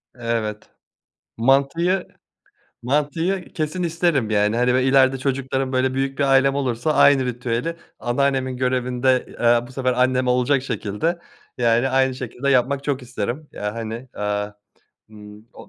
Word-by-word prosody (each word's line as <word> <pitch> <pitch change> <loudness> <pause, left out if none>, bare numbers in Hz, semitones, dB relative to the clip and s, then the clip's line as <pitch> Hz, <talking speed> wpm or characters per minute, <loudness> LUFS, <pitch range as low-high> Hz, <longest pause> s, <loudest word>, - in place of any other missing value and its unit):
Evet, 115 -3 -3 0.7
mantıyı 140 +10 +2 0.8
mantıyı 160 +8 -1
kesin 155 +3 -2
isterim. 165 -8 0
Yani, 105 +1 +2
hani, 125 +1 +2
böyle 130 +1 +2
ileride 135 0 +4
çocuklarım, 135 0 -2
böyle 130 0 +1
büyük 135 +1 -2
bir 140 - +3
ailem 135 0 +4
olursa 135 +2 -1
aynı 140 -2 +5
ritüeli 125 +5 -2 0.2
anneannemin 130 0 0
görevinde, 125 0 +1
eee, 120 0 +4
bu - - -13
sefer 130 -1 0
annem 125 0 +1
olacak 125 +2 +2
şekilde, 115 - -2 0.4
yani, 120 +2 +2
aynı 130 0 +2
şekilde 130 +2 -3
yapmak 135 +1 +2
çok 140 -2 -1
isterim 125 +4 -4
ya, 105 0 -4
hani, 115 +2 -6
eee, 105 0 -2 0.6
ımm, 105 +1 -13
o - - -14
130 Hz, 140 wpm, -22 LUFS, 120-140 Hz, 0.8 s, aynı